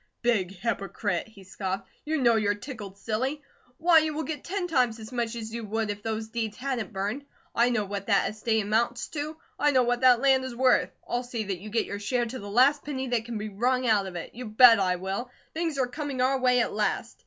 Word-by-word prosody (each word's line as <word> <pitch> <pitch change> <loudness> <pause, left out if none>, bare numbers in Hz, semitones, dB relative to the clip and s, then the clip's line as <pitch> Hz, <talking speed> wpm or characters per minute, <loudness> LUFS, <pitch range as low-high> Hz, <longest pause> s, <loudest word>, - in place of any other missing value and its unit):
"Big 210 -7 +2
hypocrite!" 200 -2 -2
he 205 -3 -15
scoffed. 190 +1 -4 0.2
"You 315 +1 0
know 240 -3 +4
you're 205 -2 +2
tickled 205 -4 -8
silly. 260 +8 -2 0.3
Why, 330 0 +6
you 310 -1 -1
will 315 - -2
get 310 -3 -5
ten 385 0 -2
times 250 -8 +2
as 220 +1 -10
much 240 -2 -2
as 220 -1 -6
you 235 0 -4
would 215 0 -1
if 205 0 -7
those 220 0 -3
deeds 220 -2 -3
hadn't 255 -6 -3
burned. 205 +7 -3 0.3
I 235 +1 +3
know 225 -4 0
what 200 0 -5
that - - +3
estate 220 +1 0
amounts 230 +4 0
to. 305 0 -4 0.2
I 295 - +4
know 260 -3 +4
what 245 0 0
that 250 -2 +6
land 265 0 +4
is 260 -2 -5
worth. 255 +1 +3 0.2
I'll 240 - -1
see 245 -3 -4
that 195 -3 -4
you 215 - -8
get 225 +2 0
your 200 - -5
share 240 +4 0
to 245 +3 -6
the 200 - -8
last 265 +7 +4
penny 265 -3 -4
that 235 -2 0
can 235 -2 -4
be 215 +1 -4
wrung 250 +5 0
out 210 -4 +3
of 185 - -8
it. 170 - -6
You 250 +1 -7
bet 230 +1 +7
I 185 -2 +2
will! 195 +7 -4 0.2
Things 325 -2 -2
are 260 - +2
coming 275 +1 -5
our 260 +1 +2
way 250 -1 +4
at - - -1
last. 210 0 -1
235 Hz, 235 wpm, -27 LUFS, 210-260 Hz, 0.3 s, bet